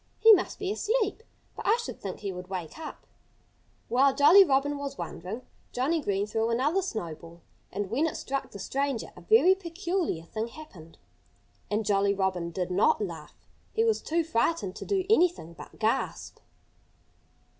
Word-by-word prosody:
"He 450 0 +8
must 375 -2 +1
be 390 -1 -2
asleep. 435 -1 0 0.3
But - - -6
I 435 +3 +5
should 470 - -6
think 195 -2 -6
he 200 -2 -3
would 180 0 -8
wake 185 - -6
up." 315 - -8 0.8
While 265 +3 +3
Jolly 305 +8 +8
was 280 -2 0
wondering, 180 +7 -6 0.3
Johnnie 305 +6 +1
Green 200 -5 0
threw 220 +2 -1
another 285 +11 +1
snowball. 170 - -6 0.3
And 200 0 -4
when 285 +8 +2
it - - -4
struck 275 0 -3
the - - -10
stranger 270 +4 -2
a - - -12
very 430 -4 +5
peculiar 350 - -3
thing 220 +6 -4
happened. 205 - -13 0.7
And 210 +1 -1
Jolly 200 -1 +2
Robin 190 -3 -1
did 180 +1 -3
not 185 +3 +3
laugh. 170 -7 -7 0.3
He 450 - +2
was 450 -1 +2
too 335 +1 0
frightened 235 - 0
to - - -7
do 385 -2 0
anything 350 - +2
but - - -12
gasp. 225 +4 -1
255 Hz, 160 wpm, -28 LUFS, -, 0.8 s, He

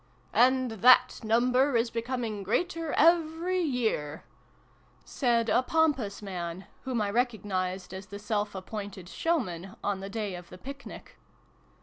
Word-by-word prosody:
" - - -33
And 260 -2 -1
that 240 +4 +5
number 250 +4 +3
is 230 0 0
becoming 230 -3 -3
greater 330 - -1
every 335 +2 +3
year," 225 - -1 0.8
said 235 -4 +1
a 245 - +4
pompous 260 -9 +1
man, 180 -1 -5 0.2
whom 255 -3 -1
I 200 - -1
recognised 195 -6 -1
as 190 +1 -8
the 200 +1 -7
self 205 0 -2
appointed 195 -1 -6
showman 195 - -2
on 205 -1 -1
the 195 +1 -6
day 210 -2 -3
of 175 -1 -9
the 180 - -11
picnic. 275 +7 -10
225 Hz, 135 wpm, -29 LUFS, 195-260 Hz, 0.8 s, that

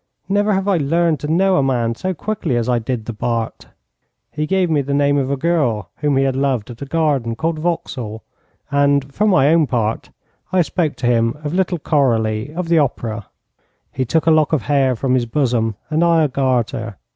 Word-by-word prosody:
Never 205 +2 +1
have 195 +1 -1
I 195 -3 +3
learned 165 +1 +1
to 150 - -3
know 190 +2 +3
a - - +3
man 120 -4 0
so 185 +11 -3
quickly 185 - -2
as 120 0 -1
I 125 -1 +2
did 115 -1 -4
the 115 - -5
Bart. 115 +1 -3 0.6
He 150 0 -3
gave 190 0 +2
me 155 -3 +1
the 140 +1 -2
name 145 0 +2
of 135 -1 -1
a 140 - -1
girl 130 - 0
whom 145 -2 0
he 135 - +3
had 135 -1 0
loved 130 -4 -1
at 120 - -12
a 140 - -5
garden 140 -7 0
called 160 +4 -2
Vauxhall, 125 -10 -3 0.5
and, 140 -1 +2
for 210 +7 +1
my 145 -9 +4
own 165 -3 +3
part, 115 -3 -1 0.4
I 185 -1 +3
spoke 160 -2 -1
to - - -5
him 115 +1 +2
of 150 +1 -3
little 185 -1 0
Coralie, 115 -6 0
of 170 +2 -4
the 165 -1 +4
Opera. 115 -7 -2 0.6
He 130 - -2
took 155 +7 0
a 165 - +5
lock 155 -1 +3
of 145 -8 +1
hair 135 +1 +2
from 130 +2 -1
his 125 -2 +1
bosom, 115 -4 0 0.2
and 155 +2 +2
I 165 -2 +4
a - - +3
garter. 120 -6 -1
140 Hz, 210 wpm, -19 LUFS, 120-165 Hz, 0.6 s, a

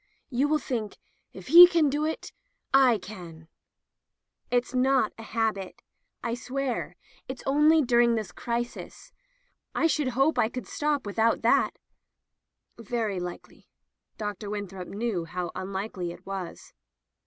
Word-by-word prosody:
You 265 +3 +2
will 305 +1 +2
think, 230 -8 -4 0.3
*if 190 +3 -11
he 350 +4 +12
can 335 -4 +3
do 295 +2 0
it, 320 - -4 0.4
I 260 -4 +6
can/'* 175 -5 -11 1.0
"It's 245 0 0
not 255 -3 +2
a - - -6
habit. 220 -4 -3 0.4
I 235 - -1
swear, 260 +1 -3 0.3
it's 260 0 -7
only 300 +3 +4
during 240 -1 +4
this 215 -5 -3
crisis. 240 +4 -5 0.6
I - - +2
should 305 -3 +1
hope 275 +4 +3
I 220 - +3
could 250 +1 -6
stop 295 -3 -1
with 205 +2 -5
out 230 +1 +2
that." - - +3 1.0
"Very 220 -3 -2
likely." 180 0 -8 0.5
Dr. 210 -1 -5
Winthrop 195 -3 -5
knew 205 -5 -2
how 175 +1 -4
unlikely 190 -2 -4
it - - -13
was. 190 -3 -7
230 Hz, 135 wpm, -27 LUFS, 195-270 Hz, 1.0 s, he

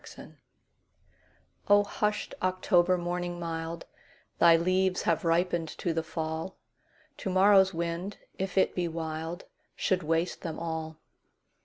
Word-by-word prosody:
October - - -12 1.3
O 205 0 +6
HUSHED 210 +1 -2
October 185 -1 +2
morning 175 0 -3
mild, 165 0 -4 0.5
Thy 170 -1 +7
leaves 185 +2 +1
have 170 -2 +1
ripened 170 0 +1
to 170 - -1
the 165 - 0
fall; 160 +2 -4 0.6
To 225 - -4
morrow's 190 0 +5
wind, 170 +3 -3 0.2
if 190 0 -3
it 190 - +3
be 180 -1 -1
wild, 160 +1 -5 0.3
Should 185 -1 0
waste 165 +2 -1
them 160 -2 -5
all. 160 -1 -4
175 Hz, 125 wpm, -29 LUFS, 165-185 Hz, 1.3 s, Thy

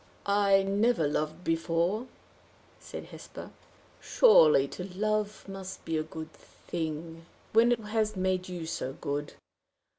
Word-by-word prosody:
"I 200 -1 +4
never 200 -3 +2
loved 155 +3 -2
before," 170 +7 0 0.7
said - - -8
Hesper. - - -10 0.5
"Surely 155 - +6
to 180 - -6
love 215 0 -1
must 195 -1 -8
be 165 - -2
a 155 - +1
good 160 0 -8
thing, 165 0 -6 0.3
when 230 +2 +6
it 235 - -2
has 215 0 -1
made 185 -1 -1
you 175 -2 -5
so 135 -4 -4
good! 145 -1 -4
180 Hz, 125 wpm, -29 LUFS, 160-210 Hz, 0.7 s, Surely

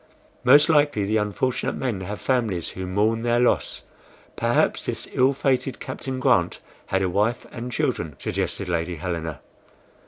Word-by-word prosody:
"Most 140 +4 +7
likely 145 -9 +3
the 110 +2 +1
unfortunate 105 +5 -1
men 120 -8 -2
have 100 +3 -5
families 110 -10 0
who 95 0 -6
mourn 105 +4 +1
their 120 0 +2
loss. 125 - +1 0.5
Perhaps - - +1
this - - -3
ill 130 +2 +4
fated 135 -2 0
Captain 130 0 -5
Grant - - +2 0.3
had 95 0 +1
a - - +2
wife 105 +6 0
and 125 +1 -6
children," 80 - -1
suggested 100 - -3
Lady 85 0 -1
Helena. 85 -2 -4
110 Hz, 150 wpm, -24 LUFS, 95-130 Hz, 0.5 s, Most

